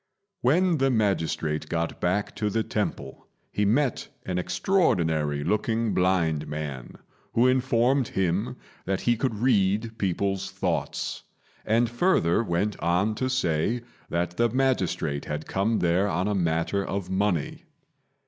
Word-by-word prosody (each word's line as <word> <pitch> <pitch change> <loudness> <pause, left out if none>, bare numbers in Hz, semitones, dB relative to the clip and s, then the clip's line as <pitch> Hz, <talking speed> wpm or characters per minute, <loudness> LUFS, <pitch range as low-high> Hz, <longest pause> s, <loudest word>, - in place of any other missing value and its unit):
When 170 +5 +3
the 135 0 +3
magistrate 80 -9 0
got 85 0 -2
back 95 +4 0
to 105 -1 0
the 110 +2 0
temple, 65 - -4 0.2
he 105 - 0
met 125 +5 +1 0.2
an 90 -1 -1
extraordinary 85 - +1
looking 110 +4 0
blind 85 -5 +1
man, 75 -5 -5 0.4
who 120 - +4
informed 130 0 +2
him 95 +5 -1 0.3
that 95 0 -1
he 120 - +2
could 115 -1 -1
read 110 -1 +1
people's 95 0 -1
thoughts, - - -2 0.5
and 115 +2 +3
further 120 - +2
went 100 +2 -1
on 90 +5 +1
to 130 +4 -2
say 115 -1 0 0.3
that 85 +1 -2
the 120 0 +3
magistrate 100 - 0
had 75 +1 -4
come 105 +4 0
there 90 +3 +2
on 90 +1 0
a 105 - 0
matter 85 +1 0
of 95 -1 -4
money. 95 -5 -1
100 Hz, 135 wpm, -26 LUFS, 85-115 Hz, 0.5 s, who